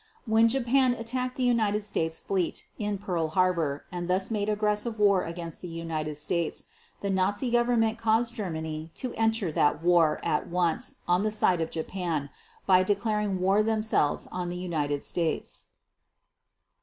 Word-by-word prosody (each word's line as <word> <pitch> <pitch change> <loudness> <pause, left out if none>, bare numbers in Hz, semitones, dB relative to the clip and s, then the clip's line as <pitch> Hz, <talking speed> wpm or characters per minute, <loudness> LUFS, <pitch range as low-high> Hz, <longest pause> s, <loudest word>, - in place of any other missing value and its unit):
And 220 - -3
when 225 +1 +6
Japan 255 +1 +2
attacked 250 +2 -3
the 260 - 0
United 215 -4 +2
States 160 -5 -2
fleet 185 -4 -2
in 210 -1 -1
Pearl 180 -5 -1
Harbor 165 -4 0
and 175 0 -4
thus 190 +3 +1
made 210 -1 0
aggressive 210 +2 0
war 200 -3 +4
against 165 -1 -6
the 180 - -6
United 160 -3 -4
States, 170 +2 -1 0.4
the 200 - -1
Nazi 200 +6 0
Government 235 -2 +2
caused 230 +1 +2
Germany 160 -7 -4
to 255 - -4
enter 225 -5 +1
that 150 +1 +1
war 170 -3 +4
at 150 - 0
once 180 +10 0
on 175 +1 +3
the 215 - +1
side 185 -5 +2
of 160 - -1
Japan 160 -3 -3 0.3
by 185 -1 +5
declaring 205 0 0
war 195 +3 +3
themselves 215 -8 +1
on 180 -1 -3
the 175 - -4
United 150 -5 -2
States. 160 - -2
190 Hz, 155 wpm, -28 LUFS, 165-220 Hz, 0.4 s, when